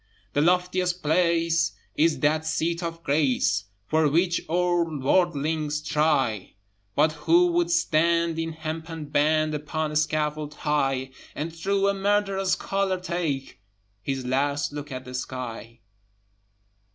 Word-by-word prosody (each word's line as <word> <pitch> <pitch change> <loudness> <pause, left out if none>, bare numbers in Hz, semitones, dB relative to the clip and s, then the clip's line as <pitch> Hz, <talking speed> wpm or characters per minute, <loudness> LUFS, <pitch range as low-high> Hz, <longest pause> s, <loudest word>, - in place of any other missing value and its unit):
The 145 - +2
loftiest 180 +1 +1
place 165 +1 +2 0.2
is 155 -3 +2
that 155 +2 +2
seat 165 +2 -1
of 165 -1 -5
grace 140 -8 +1 0.2
For 155 +4 +2
which 170 +3 +2
all 175 0 +2
worldlings 150 0 +1
try: 150 -9 0 0.4
But 155 +2 +4
who 170 +3 +3
would 170 0 +1
stand 170 0 +2
in 165 0 -3
hempen 160 -1 -6
band 155 +1 +2
Upon 150 +1 -2
a - - -6
scaffold 150 -1 -1
high, 135 -3 0 0.2
And 160 +3 -4
through 195 +3 +1
a 200 - +3
murderer's 195 -1 +1
collar 195 -1 -1
take 160 - -3 0.4
His 135 +3 -3
last 145 +3 0
look 145 0 -6
at 130 0 -6
the 125 - -9
sky? 120 -3 -6
155 Hz, 125 wpm, -25 LUFS, 145-170 Hz, 0.4 s, But